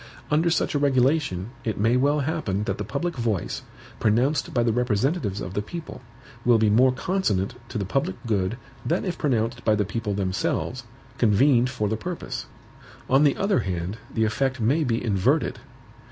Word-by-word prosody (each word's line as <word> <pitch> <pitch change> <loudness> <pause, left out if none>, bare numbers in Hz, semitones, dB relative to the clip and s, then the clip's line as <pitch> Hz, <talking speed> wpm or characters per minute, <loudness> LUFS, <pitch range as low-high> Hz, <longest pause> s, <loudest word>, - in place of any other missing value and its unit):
Under 160 +3 +3
such 165 - +1
a 145 - +1
regulation, 130 - +1
it 110 -3 -2
may 115 +4 +3
well 145 +3 +2
happen 130 - -1
that 100 -2 -3
the - - -1
public 170 - -3
voice, 115 -6 -1 0.4
pronounced 125 +7 +2
by 120 - +2
the 115 -1 +2
representatives 120 - 0
of 90 +1 -5
the 105 - 0
people, 160 +6 -8 0.4
will 120 -1 +5
be 110 -1 +3
more 125 +5 +5
consonant 125 - 0 0.2
to - - -4
the 100 - -1
public 140 - -1
good 105 -1 0 0.3
than 170 +5 0
if 180 -3 -2
pronounced 120 -3 0
by 110 - +3
the 105 -1 +1
people 105 0 -3
themselves, 95 -2 -1 0.3
convened 120 +3 +4
for 115 -5 -1
the 110 +2 -1
purpose. 175 +8 -5 0.6
On 135 +3 +6
the 145 -2 +3
other 195 0 +2
hand, 90 +3 -3
the 110 - 0
effect 130 +4 0
may 135 +9 +2
be 120 -3 -1
inverted. 100 -4 +1
120 Hz, 175 wpm, -25 LUFS, 105-140 Hz, 0.6 s, On